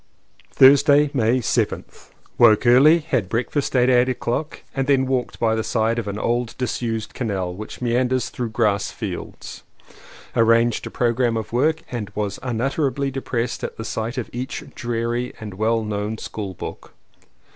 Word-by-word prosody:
Thursday, 140 +2 +6
May 120 -2 +2
7th. - - -2 0.3
Woke 115 -1 +6
early, 135 +7 +7
had 130 - -1
breakfast 125 +5 -1
at 125 -1 +4
eight 125 0 +4
o'clock 125 +4 -3
and 135 -2 -1
then 135 -2 +3
walked 130 -2 -2
by 115 -1 +2
the 110 0 -1
side 115 +1 0
of 110 - -5
an 100 0 -3
old 120 +1 -1
dis 125 -1 -2
used 115 -2 -3
canal 95 -7 -2
which 110 +5 -8
meanders 125 +1 +1
through 120 -2 -4
grass 110 -3 +1
fields. - - -7 0.7
Arranged 115 0 +3
a - - -6
programme 120 -1 +1
of 110 0 -5
work 155 +6 +1
and 115 -5 -4
was 105 -1 -3
unutterably 135 +2 -1
depressed 125 -3 -3
at - - -5
the 110 - -6
sight 115 +3 -3
of 125 - -3
each 125 +2 -4
dreary 120 +1 -2
and 105 -3 -7
well 110 +3 0
known 105 +1 -3
school 100 -4 -6
book. - - -8
120 Hz, 160 wpm, -22 LUFS, 110-130 Hz, 0.7 s, early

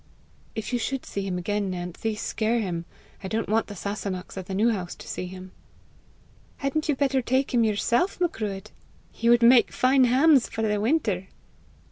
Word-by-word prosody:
"If 220 +2 -4
you 245 - +1
should 265 +3 -3
see 200 - -4
him 180 -2 -2
again, 205 +2 -1
Nancy, 180 +4 -3
scare 220 +2 -1
him. 175 -5 -3 0.4
I - - -3
don't 220 +3 -2
want 220 +2 +1
the 205 - -8
Sasunnachs 200 -1 -5
at 190 -2 -6
the 190 - -4
New 225 +4 +3
House 185 -5 -4
to - - -12
see 180 - -4
him." 185 0 -10 1.1
"Hadn't 305 +3 -2
you 295 - +3
better 270 -1 +1
take 260 +3 0
him 235 -2 +4
yourself, 235 - +1
Macruadh? 215 - -2 0.4
He 230 - 0
would 240 0 +5
make 240 +1 +6
fine 260 0 +4
hams 265 +1 +4
for 225 - -3
the 210 -1 +1
winter!" 215 - 0
220 Hz, 180 wpm, -26 LUFS, 195-255 Hz, 1.1 s, make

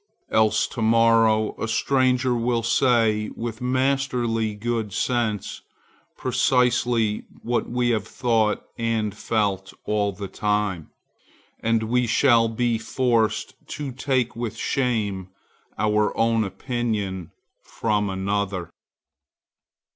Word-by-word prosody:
Else 110 0 +3
to 115 - -6
morrow 115 -1 +4
a 110 - -1
stranger 130 +1 +2
will 120 0 0
say 115 -3 +2
with 115 -1 -5
masterly 125 -4 0
good 110 -1 -2
sense 115 -5 -1 0.6
precisely 120 -4 +1 0.2
what 120 0 -1
we 125 0 0
have 110 -2 -1
thought 110 -4 +1 0.2
and 110 -3 -1
felt 100 -4 -1
all 105 -1 0
the 100 +1 -7
time, 105 -4 -1 0.7
and 115 0 +1
we 120 +2 +1
shall 115 -1 +4
be 115 0 0
forced 115 -1 0
to 145 -3 -5
take 130 -2 -1
with 115 -2 -4
shame 105 -8 -1 0.5
our 105 +1 +1
own 115 -1 +2
opinion 100 - -3 0.3
from 105 -2 -1
another. 95 -1 -2
115 Hz, 105 wpm, -24 LUFS, 105-120 Hz, 0.7 s, morrow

